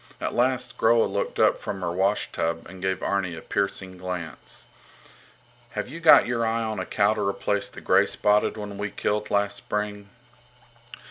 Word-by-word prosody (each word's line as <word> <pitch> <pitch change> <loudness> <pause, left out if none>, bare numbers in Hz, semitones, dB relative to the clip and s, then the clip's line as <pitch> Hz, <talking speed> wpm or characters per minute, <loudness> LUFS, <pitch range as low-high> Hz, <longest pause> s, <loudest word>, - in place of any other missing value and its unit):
At - - -3
last 125 0 0
Groa 115 0 +4
looked - - -3
up - - +4
from 95 -2 -5
her 85 - -1
washtub 90 -3 -1
and 95 +1 -11
gave 95 0 -1
Arni 95 -3 -1
a 80 - -8
piercing 95 -2 -3
glance. 90 -4 -6 1.1
Have - - -3
you 155 +7 -8
got 165 -2 +7
your 120 -1 -1
eye 115 0 0
on 110 -2 -3
a 95 - -4
cow 100 +1 +3
to 110 - -3
replace 100 +1 0
the - - -11
greyspotted 105 +1 +2
one 105 -1 -6
we 105 0 -2
killed 105 +1 -2
last 100 0 +1
spring? 105 -1 -4
100 Hz, 170 wpm, -25 LUFS, 95-110 Hz, 1.1 s, got